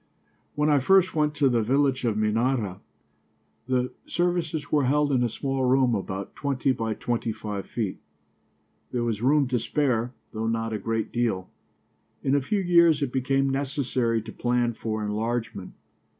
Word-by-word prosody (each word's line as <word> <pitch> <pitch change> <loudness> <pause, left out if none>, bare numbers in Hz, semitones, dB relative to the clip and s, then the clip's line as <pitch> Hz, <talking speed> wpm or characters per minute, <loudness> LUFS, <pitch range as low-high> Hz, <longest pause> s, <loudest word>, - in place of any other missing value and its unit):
When 150 +1 +2
I 145 - +5
first 185 +6 +4
went 150 -1 +1
to 145 -2 +3
the 120 -3 +2
village 135 +2 +1
of 110 -3 0
Minyara, 110 -2 0 0.9
the 125 -1 0 0.2
services 170 -4 -1
were 145 -3 +3
held 145 +2 +2
in 130 -2 +2
a 120 - +1
small 135 +3 -2
room 130 -1 +3
about 95 -1 -4
twenty 140 -1 0
by 115 -3 -2
twenty 120 0 -2
five 105 -2 -5
feet. 110 -6 -3 0.9
There 120 -1 -1
was 115 -3 -2
room 140 +2 +3
to 125 -2 +1
spare, 125 -1 0 0.2
though 110 0 -2
not 115 0 -1
a 110 - -2
great 115 +2 -2
deal. 115 -6 -1 0.7
In 135 - +1
a 140 - +3
few 195 +10 0
years 170 -4 +4
it 125 - -3
became 135 +1 +1
necessary 130 -5 -1
to - - -8
plan 120 -1 0
for 110 -1 -3
enlargement. 110 -2 -3
125 Hz, 165 wpm, -26 LUFS, 115-140 Hz, 0.9 s, I